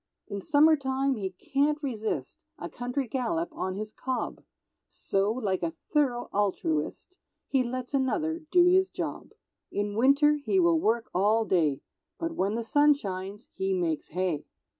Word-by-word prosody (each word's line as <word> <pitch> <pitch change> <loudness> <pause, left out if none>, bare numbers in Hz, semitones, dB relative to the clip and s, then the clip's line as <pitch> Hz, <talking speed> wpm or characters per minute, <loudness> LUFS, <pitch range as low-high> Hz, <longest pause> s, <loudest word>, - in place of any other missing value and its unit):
In 200 0 -5
summertime 275 -1 +3
he 200 -6 -3
can't 280 +10 0
resist 220 - -3
A 170 - -5
country 250 +2 -3
gallop 275 +8 -1
on 185 0 -3
his 215 +1 -5
cob, 260 +2 -4 0.5
So, 195 +2 0
like 210 -6 -1
a 170 - 0
thorough 245 - 0
altruist, 195 - -1 0.3
He 270 - +1
lets 250 +2 -5
another 310 +5 0
do 355 0 +5
his 375 +1 +4
job; - - -5 0.4
In 205 0 -2
winter 280 +5 +4
he 380 - +2
will 340 -2 +4
work 235 -2 0
all 215 +5 +3
day, 155 -9 +1 0.4
But 330 0 -3
when 205 -7 0
the 230 - -2
sun 290 +5 +4
shines 195 -2 -6
he 190 0 -1
makes 165 -4 -1
Hay. 180 -3 -2
240 Hz, 150 wpm, -28 LUFS, 195-290 Hz, 0.5 s, do